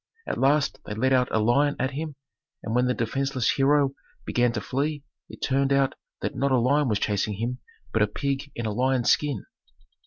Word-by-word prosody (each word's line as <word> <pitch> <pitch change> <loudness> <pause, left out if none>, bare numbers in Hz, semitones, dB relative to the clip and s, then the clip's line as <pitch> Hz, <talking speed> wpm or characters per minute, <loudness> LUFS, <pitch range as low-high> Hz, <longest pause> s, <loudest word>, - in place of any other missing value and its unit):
At - - -3
last 140 +2 +2
they 105 - -4
let 130 +4 +2
out 125 -1 +3
a - - 0
lion 140 +7 +3
at 130 +1 -1
him 150 +1 -5 0.5
and 110 - -3
when 125 +1 +3
the 125 - +1
defenceless 130 +1 0
hero 140 0 +3 0.3
began 120 -1 +2
to - - -1
flee 145 +2 -2 0.3
it - - -10
turned 135 0 +1
out 135 -1 +3 0.3
that - - -3
not 140 0 0
a 130 - +4
lion 140 +4 +3
was 105 -3 +1
chasing 105 0 -1
him, 120 +4 -3 0.3
but 110 - +2
a 105 - +4
pig 140 +5 -3
in 120 - -4
a 110 - -1
lion's 130 +1 +2
skin. 145 -8 0
130 Hz, 205 wpm, -26 LUFS, 120-140 Hz, 0.5 s, a